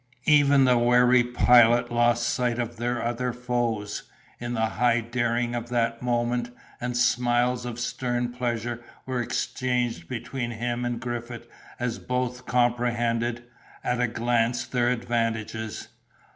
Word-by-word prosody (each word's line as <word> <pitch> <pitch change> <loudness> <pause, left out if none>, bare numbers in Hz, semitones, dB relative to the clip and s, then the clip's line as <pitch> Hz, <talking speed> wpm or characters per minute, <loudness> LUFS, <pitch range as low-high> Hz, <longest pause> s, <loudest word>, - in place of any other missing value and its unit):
Even 145 -2 +5
the 125 -1 +4
wary 125 +1 +5
Pilot 120 0 +5
lost 120 0 +2
sight 120 -1 0
of 120 -1 -3
their 120 0 -2
other 120 +1 -1
foes, 120 -4 -2 0.4
in 120 0 -4
the 110 -1 +1
high 120 +2 +2
daring 120 0 -1
of 120 0 -4
that 115 -1 0
moment, 120 0 0 0.3
and 125 0 -2
smiles 120 0 +2
of 120 -1 -6
stern 120 0 -2
pleasure 120 -1 -3 0.2
were 130 -2 -2
exchanged 120 -6 -2
between 120 +1 -4
him 120 +1 -3
and 120 -1 -2
Griffith 120 -1 -5 0.3
as 120 -1 -2
both 125 0 -3
comprehended, 120 -1 +1 0.4
at 125 0 0
a 125 - +3
glance, 120 +1 0
their 120 0 +1
advantages. 115 -2 -2
120 Hz, 130 wpm, -26 LUFS, 120-125 Hz, 0.4 s, Even